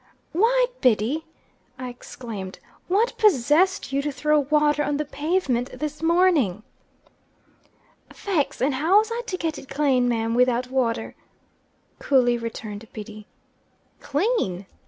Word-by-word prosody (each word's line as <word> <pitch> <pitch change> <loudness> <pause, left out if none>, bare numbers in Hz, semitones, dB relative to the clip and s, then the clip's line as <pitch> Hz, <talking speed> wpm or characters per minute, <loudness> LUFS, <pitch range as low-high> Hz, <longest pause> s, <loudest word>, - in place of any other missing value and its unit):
"Why, 480 +8 +3 0.2
Biddy!" 255 +6 +1 0.5
I 255 0 -5
exclaimed, 225 -5 -8 0.3
"what 425 +7 +1
possessed 355 - +3
you 275 - +1
to 295 +1 -2
throw 300 +3 +2
water 295 +1 +2
on 290 -1 -1
the 300 - -2
pavement 290 -5 -1
this 300 0 -5
morning?" 325 - +2 1.5
"Faix! 345 -12 -2
And 275 +1 +2
how 320 +9 +3
was 435 +2 +2
I 470 +1 -2
to 370 - -3
get 325 -2 -3
it 265 - -14
clane, 270 -3 +2
mim, 230 -1 0
widout 250 +1 +2
wather?" 245 -3 -1 0.9
coolly 250 -3 +3
returned 225 -2 -7
Biddy. 215 -1 -9 0.7
"Clean!" 290 - -1
280 Hz, 125 wpm, -24 LUFS, 240-325 Hz, 1.5 s, Why